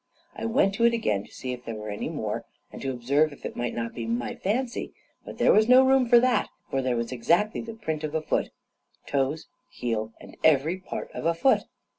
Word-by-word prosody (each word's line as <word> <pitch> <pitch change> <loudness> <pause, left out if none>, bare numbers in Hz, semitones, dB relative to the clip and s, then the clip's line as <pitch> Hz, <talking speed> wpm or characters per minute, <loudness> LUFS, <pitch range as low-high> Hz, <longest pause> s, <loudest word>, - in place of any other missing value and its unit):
I - - -5
went 225 -4 +2
to 230 +4 +2
it 235 0 +4
again 105 - 0
to - - -19
see 130 -1 -5
if 125 0 -9
there 115 -2 -5
were 105 0 -6
any 105 - -4
more, - - -3 0.3
and - - -9
to 135 - -2
observe 140 +5 +1
if 140 - -12
it - - -5
might 120 0 -3
not 115 0 -3
be 115 -2 -5
my 120 +1 -2
fancy; 240 +5 -2 0.3
but - - -9
there - - +5
was 215 +2 +4
no 255 +1 +8
room 260 -2 +4
for 240 -1 +8
that, 245 -4 +2 0.2
for 135 - +1
there 130 -1 0
was 115 +1 -2
exactly 170 - +1
the 230 -1 -8
print 160 -8 -4
of 155 0 -3
a 160 - +1
foot - - 0 0.6
toes, 140 +2 -1 0.2
heel, 110 -2 -3
and - - -13
every 160 +4 +3
part 185 - -6
of - - -3
a 165 - +2
foot. 260 +11 +3
155 Hz, 230 wpm, -26 LUFS, -, 0.6 s, no